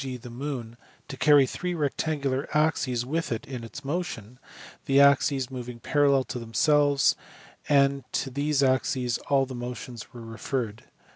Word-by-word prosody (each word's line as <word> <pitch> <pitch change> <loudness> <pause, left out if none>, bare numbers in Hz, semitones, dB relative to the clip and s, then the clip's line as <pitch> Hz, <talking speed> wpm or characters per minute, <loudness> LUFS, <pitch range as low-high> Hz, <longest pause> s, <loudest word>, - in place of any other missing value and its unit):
g. 130 -2 -5
the 120 0 -11
moon, 120 -3 -5 0.3
to 135 - -7
carry 145 0 +5
three 180 +7 -4
rectangular 140 -2 -1
axes 130 -6 +1
with 160 +4 -2
it 115 - -3
in 125 -3 -6
its 115 +5 -9
motion, 130 - -4 0.5
the 135 0 +4
axes 140 -2 +4
moving 125 -2 -7
parallel 140 0 +3
to 125 - -6
themselves, 145 +4 +3 0.5
and 140 -1 +3
to 135 - -2
these 140 +1 +1
axes 130 -2 +1
all 135 -1 +3
the 130 - -8
motions 120 -1 -7
were 120 - -10
referred. 115 0 -4
135 Hz, 150 wpm, -26 LUFS, 125-145 Hz, 0.5 s, carry